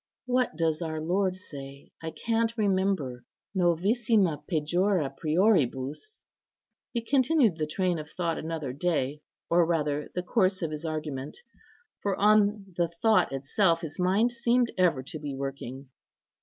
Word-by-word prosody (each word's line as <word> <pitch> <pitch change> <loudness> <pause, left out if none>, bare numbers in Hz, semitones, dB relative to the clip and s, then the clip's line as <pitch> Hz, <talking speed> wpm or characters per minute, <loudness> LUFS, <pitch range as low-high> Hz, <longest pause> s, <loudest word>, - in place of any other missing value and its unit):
What 250 -6 +1
does 160 -1 0
our 160 -2 -3
Lord 185 +4 0
say? 140 -6 -10
I 165 - -4
can't 230 +5 -1
remember: 190 - 0 0.3
'Novissima 185 - +2
pejora 175 -1 +1
prioribus.' 155 - 0 0.3
" - - -62
He 235 - +1
continued 260 - +3
the 155 - 0
train 180 +1 0
of 155 0 -8
thought 170 -2 -2
another 155 -5 -4
day, 150 -2 -1 0.3
or 170 +1 +4
rather 150 -3 -1
the 180 - -1
course 190 -2 +1
of 160 - -2
his 150 +1 -5
argument; 150 -4 -4 0.6
for 200 -2 0
on 205 -2 +3
the 170 -1 +1
thought 195 +5 +2
itself 165 +6 +1
his 160 -2 -7
mind 195 +7 +3
seemed 240 0 +2
ever 170 -8 +2
to 155 +4 -7
be 145 -2 -5
working. 135 -1 -6
170 Hz, 140 wpm, -28 LUFS, 150-200 Hz, 0.6 s, or